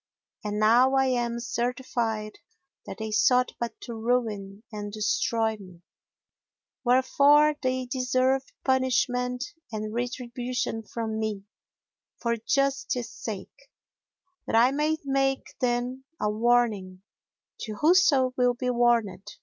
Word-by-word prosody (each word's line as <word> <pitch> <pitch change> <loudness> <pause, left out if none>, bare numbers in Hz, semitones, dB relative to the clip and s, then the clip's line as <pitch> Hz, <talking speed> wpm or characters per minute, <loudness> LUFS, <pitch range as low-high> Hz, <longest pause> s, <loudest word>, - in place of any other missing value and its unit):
And 210 0 -3
now 240 +5 +4
I 265 0 +4
am 240 -2 0
certified 235 -3 -2 0.5
that - - -7
they 220 0 -5
sought 250 +3 +3
but 235 0 -4
to 235 - -7
ruin 220 -4 -2
and 205 -1 -6
destroy 220 +1 0
me, 180 -4 -14 1.0
wherefore 280 +4 +5
they 255 -1 -1
deserve 255 +1 +1 0.2
punishment 250 -1 +1 0.3
and 215 -1 -4
retribution 245 -1 -3
from 220 0 -4
me, 215 -3 -3 0.8
for 235 -1 0
justice 270 +1 -1
sake, 225 - -8 0.8
that - - -1
I 240 +3 +5
may 300 +3 0
make 270 -1 0
them 250 +1 -1
a 210 - 0
warning 215 -5 +1 0.6
to 215 - -5
whoso 295 - +4
will 250 -1 +2
be 250 +1 -1
warned. 235 -5 +1
240 Hz, 115 wpm, -27 LUFS, 220-260 Hz, 1.0 s, wherefore